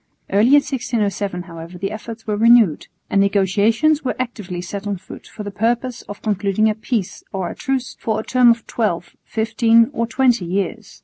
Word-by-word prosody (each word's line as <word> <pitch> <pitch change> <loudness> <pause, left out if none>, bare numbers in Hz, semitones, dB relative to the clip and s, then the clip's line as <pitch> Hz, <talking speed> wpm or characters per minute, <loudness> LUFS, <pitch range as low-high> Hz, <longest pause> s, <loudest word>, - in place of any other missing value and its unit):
Early 205 +4 +4
in 270 - +4
1607 205 -8 -2
however 170 0 -10
the 195 +3 -3
efforts 220 +1 -8
were 210 - -1
renewed, 225 -6 +4 0.2
and 195 - +2
negotiations 210 - +2
were 260 - -1
actively 215 -8 -4
set 195 +3 -6
on 200 -1 -2
foot - - -12
for 210 - -8
the 205 - -5
purpose 235 +4 -1
of 205 - -8
concluding 205 0 +1
a - - -1
peace 220 -2 -3
or 190 -3 -3
a - - -9
truce 265 -2 -2
for 220 -1 -1
a - - -4
term 250 0 +4
of 230 -1 +2
twelve, 190 -7 -2
fifteen 225 +2 +3
or 230 -2 -1
twenty 245 -5 +2
years. 195 +4 -3
215 Hz, 185 wpm, -20 LUFS, 195-235 Hz, 0.2 s, Early